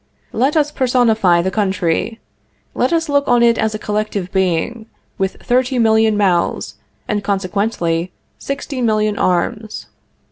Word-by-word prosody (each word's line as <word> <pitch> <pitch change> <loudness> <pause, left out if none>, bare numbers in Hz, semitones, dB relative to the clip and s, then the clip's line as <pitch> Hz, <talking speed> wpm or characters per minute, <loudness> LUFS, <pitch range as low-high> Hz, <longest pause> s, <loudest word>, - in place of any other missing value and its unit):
Let 270 +7 +1
us 295 -1 +2
personify 225 -10 +2
the 190 - -1
country. 190 +2 -1 0.5
Let - - 0
us 330 -1 +1
look 285 -1 +1
on 240 -1 +4
it 235 -1 +3
as 220 -1 0
a - - -2
collective 210 -3 -3
being, 190 +5 -1 0.3
with 190 0 0
thirty 255 +1 0
million 220 -2 +3
mouths, 185 -4 0 0.3
and, 205 -1 -1
consequently, 185 -3 -1 0.3
sixty 275 -1 -4
million 215 -2 +1
arms. 210 +5 -1
215 Hz, 135 wpm, -17 LUFS, 190-240 Hz, 0.5 s, on